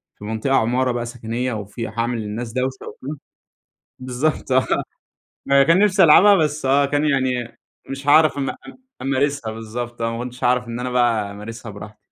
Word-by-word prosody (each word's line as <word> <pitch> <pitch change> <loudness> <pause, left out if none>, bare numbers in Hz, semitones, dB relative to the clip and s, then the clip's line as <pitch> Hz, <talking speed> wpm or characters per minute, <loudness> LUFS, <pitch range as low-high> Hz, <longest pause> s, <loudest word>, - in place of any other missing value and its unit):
في - - -15
منطقة 110 +5 -1
عمارة 125 +2 +2
بقى 120 -1 -3
سكنيَّة، 120 +1 -4
وفي 105 +2 -5
هاعمل 115 +1 -2
للناس 110 +2 -5
دوّشة 130 0 -3
وبتاع. 145 +4 -7 0.8
بالضبط، 130 +3 -2
آه، 130 0 +3 0.8
ما 140 0 +5
كان 170 +7 +4 0.2
ألعبها 190 +5 +8
بس، 150 -4 0
آه، 140 +2 +4
كان 145 +2 0
يعني 130 -4 -1 0.3
مش 135 +1 -6
هاعرف 155 0 +5
أ 135 -1 -2 0.5
أمارسها، 140 -3 -1
بالضبط، 115 +2 -6
آه، 115 0 0
ما 120 - -4
كُنتِش 125 +1 -7
هاعرف 125 0 +2
إن 115 +1 -5
أنا 125 0 -3
بقى 115 -4 +1
أمارسها 105 +2 -8
براحتي. 105 +1 -11
125 Hz, 165 wpm, -21 LUFS, 115-140 Hz, 0.8 s, ألعبها